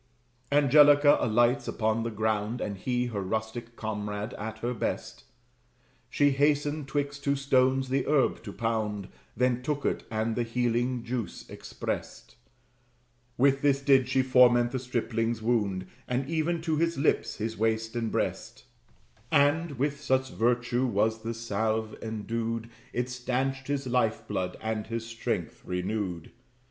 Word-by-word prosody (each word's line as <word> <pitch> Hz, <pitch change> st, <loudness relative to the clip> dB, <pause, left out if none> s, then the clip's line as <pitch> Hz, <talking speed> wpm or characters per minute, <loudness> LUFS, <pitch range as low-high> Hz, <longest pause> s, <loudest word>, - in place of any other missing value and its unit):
Angelica 145 Hz, 0 st, +6 dB
alights 120 Hz, +3 st, +2 dB
upon 110 Hz, 0 st, 0 dB
the 115 Hz, -, -2 dB
ground, 110 Hz, +1 st, -1 dB
And 100 Hz, -, -3 dB
he, 125 Hz, +5 st, -1 dB
her 110 Hz, -5 st, -3 dB
rustic 110 Hz, +4 st, -4 dB
comrade, 105 Hz, 0 st, -4 dB
at 110 Hz, +2 st, -6 dB
her 120 Hz, +1 st, -2 dB
best. 115 Hz, -, -4 dB, 0.8 s
She 145 Hz, +2 st, +3 dB
hastened 145 Hz, +1 st, +1 dB
'twixt 145 Hz, 0 st, -2 dB
two 140 Hz, 0 st, +2 dB
stones 130 Hz, -1 st, +2 dB
the 135 Hz, 0 st, 0 dB
herb 145 Hz, -3 st, +2 dB
to 100 Hz, -, -5 dB
pound, 105 Hz, -3 st, -2 dB, 0.3 s
Then 125 Hz, 0 st, +2 dB
took 145 Hz, +2 st, -2 dB
it, -, -, 0 dB
and 110 Hz, +1 st, -1 dB
the 120 Hz, -, 0 dB
healing 120 Hz, +1 st, 0 dB
juice 115 Hz, -6 st, -4 dB
exprest: -, -, -6 dB, 1.0 s
With 135 Hz, +1 st, +3 dB
this 140 Hz, -1 st, +3 dB
did 135 Hz, -2 st, +4 dB
she 130 Hz, 0 st, +3 dB
foment 120 Hz, -2 st, +5 dB
the 130 Hz, -, -2 dB
stripling's 115 Hz, -2 st, -1 dB
wound, 105 Hz, -6 st, 0 dB, 0.2 s
And 125 Hz, +2 st, -1 dB
even 165 Hz, +1 st, -1 dB
to 160 Hz, -2 st, 0 dB
the 170 Hz, +2 st, +3 dB
hips, 145 Hz, -, +1 dB
his 110 Hz, 0 st, -3 dB
waist 110 Hz, +1 st, 0 dB
and 115 Hz, -2 st, -1 dB
breast; -, -, -3 dB, 0.7 s
And 145 Hz, +2 st, +3 dB
(with 140 Hz, +2 st, -1 dB
such 130 Hz, -2 st, +1 dB
virtue 120 Hz, +4 st, +1 dB
was 110 Hz, 0 st, +1 dB
the 115 Hz, +1 st, -4 dB
salve 110 Hz, -1 st, -1 dB
endued) 115 Hz, +1 st, -3 dB, 0.2 s
It 125 Hz, +1 st, -1 dB
stanched 130 Hz, +2 st, -2 dB
his 140 Hz, -1 st, -1 dB
life 115 Hz, -3 st, 0 dB
blood, 90 Hz, -1 st, -2 dB
and 110 Hz, -1 st, -3 dB
his 115 Hz, 0 st, -4 dB
strength 115 Hz, 0 st, -3 dB
renewed. 90 Hz, -2 st, -3 dB
120 Hz, 145 wpm, -28 LUFS, 110-135 Hz, 1.0 s, Angelica